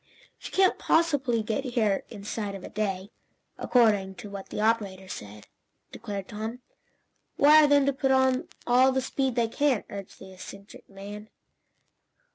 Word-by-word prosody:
"She - - -9
can't 380 -1 +3
possibly 280 -9 +1
get 220 +5 -2
here 225 -6 0
inside 205 -1 -5
of 190 - -9
a - - -8
day, 200 -1 -3 0.5
according 205 -6 +2
to 200 +2 -10
what 195 -1 -8
the - - -5
operator 205 -4 0
said," 105 - -9 0.5
declared 205 -4 -6
Tom. 220 +4 -6 0.8
"Wire 300 +1 +7
them 285 -1 +4
to 280 - +2
put 270 0 -1
on 260 -1 +2 0.2
all 255 +2 +5
the 265 0 0
speed 265 -1 -1
they 235 -2 +2
can," 265 0 +1
urged 200 -1 -8
the 190 -1 -12
eccentric 195 +2 -12
man. 205 +2 -9
220 Hz, 150 wpm, -27 LUFS, 200-260 Hz, 0.8 s, Wire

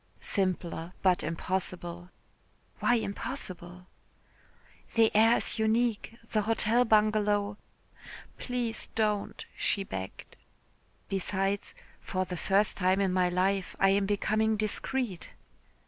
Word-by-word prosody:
"Simpler 180 -3 -2
but 185 -2 +4
impossible." 175 +1 -3 0.7
"Why 245 - +3
impossible?" 185 -5 -4 1.1
"The 225 -2 +4
air 225 +2 +6
is - - 0
unique. 225 0 0
The 215 - +2
Hotel 225 +3 +2
Bungalow...." 210 -2 +2 0.8
"Please 245 -2 -2
don't," 210 -2 -1
she 200 - +1
begged. 95 - -7 0.7
"Besides, 195 +1 -1 0.2
for 185 0 -2
the 180 - -5
first 195 +4 +2
time 185 0 +2
in 195 -2 +1
my 180 -1 +3
life 190 +1 0
I 195 - +5
am 195 0 +2
becoming 215 +2 +1
discreet." 215 -1 -2
200 Hz, 105 wpm, -29 LUFS, 185-220 Hz, 1.1 s, air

